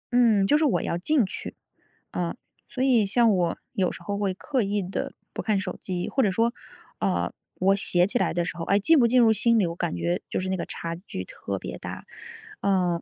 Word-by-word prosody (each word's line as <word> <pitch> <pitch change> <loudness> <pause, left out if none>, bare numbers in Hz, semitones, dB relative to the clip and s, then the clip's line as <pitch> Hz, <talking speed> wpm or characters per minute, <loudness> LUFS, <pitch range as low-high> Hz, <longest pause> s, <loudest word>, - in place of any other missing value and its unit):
嗯， 220 -5 +5
就 295 +9 +4
是 - - +2
我 180 - +2
要 170 - -1
进 250 - +2
去。 - - -5 0.6
啊， 175 +2 -2 0.3
所 260 - -2
以 240 -6 +4
像 225 -1 +4
我 175 -2 0 0.2
有 185 -2 +1
时 - - -10
候 200 0 -3
会 195 -2 0
刻 265 +3 -1
意 200 -1 0
地 185 - -4 0.2
不 - - -3
看 215 -3 +1
手 - - -4
机， 180 -2 -3
或 270 - +1
者 210 - +3
说， 230 +5 +1 0.5
呃， - - 0 0.2
我 195 +2 +3
写 180 -2 +2
起 245 +5 0
来 - - +1
的 175 0 0
时 175 - -4
候， 165 - -5
哎， 200 - +3
进 295 +9 +5
不 235 - +5
进 250 +2 +4
入 225 -2 +6
心 230 +2 +3
里， 200 - +3
我 170 0 -3
感 85 - -2
觉 85 +1 -1
就 - - -1
是 185 - -3
那 190 - 0
个 - - -3
差 165 0 -4
距 180 - -7
特 - - -5
别 - - -6
大。 - - -7 0.6
嗯。 180 -3 +1
200 Hz, 250 characters per minute, -26 LUFS, 180-235 Hz, 0.6 s, 入